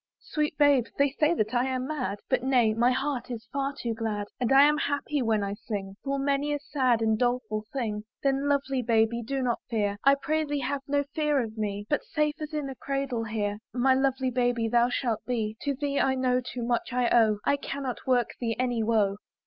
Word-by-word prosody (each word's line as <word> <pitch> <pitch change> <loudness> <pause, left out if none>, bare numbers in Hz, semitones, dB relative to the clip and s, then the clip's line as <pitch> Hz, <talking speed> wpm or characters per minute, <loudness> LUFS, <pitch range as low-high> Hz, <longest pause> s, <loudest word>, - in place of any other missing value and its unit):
"Sweet 300 -1 -2
babe! 285 -5 +5
they 280 0 +3
say 305 +4 +2
that 215 -4 -1
I 245 +1 +2
am 255 -1 -2
mad, 255 -9 -3
But 260 -2 +1
nay, 245 -4 +3
my 235 +3 +3
heart 260 -1 -1
is 230 -2 -6
far 275 0 0
too 235 -4 -2
glad; 215 -2 -3
And 245 0 0
I 270 +1 +8
am 300 +1 +4
happy 285 0 -1
when 220 -3 +1
I 200 0 -2
sing 205 -2 -5
Full 275 0 -1
many 280 +1 0
a - - -1
sad 255 -5 +1
and 220 -1 +2
doleful 245 -3 0
thing: 215 -5 -3 0.2
Then, 275 0 +1
lovely 275 -2 +1
baby, 230 0 +2
do 265 +3 -2
not 240 -2 0
fear! 205 -3 0
I 275 0 +6
pray 310 +3 -1
thee 290 -1 -2
have 275 +2 -2
no 285 0 +1
fear 300 -2 +1
of 225 -3 -3
me, 205 -2 -3
But, 295 - 0
safe 300 0 -1
as 305 0 -5
in 300 -2 -2
a 270 - -5
cradle, 275 -3 -2
here 210 -2 -2 0.2
My 260 +1 +4
lovely 265 -1 +1
baby! 245 -2 +1
thou 240 +1 +3
shalt 235 -3 -1
be, 220 -4 -1
To 285 -1 -1
thee 280 0 -1
I 265 0 +2
know 255 -1 +1
too 245 0 -6
much 240 +2 -1
I 250 -1 +1
owe; 220 -3 +4
I - - +3
cannot 275 -3 -5
work 245 -3 +2
thee 230 -2 -1
any 245 -2 0
woe. 215 -3 +2
250 Hz, 220 wpm, -27 LUFS, 225-280 Hz, 0.2 s, I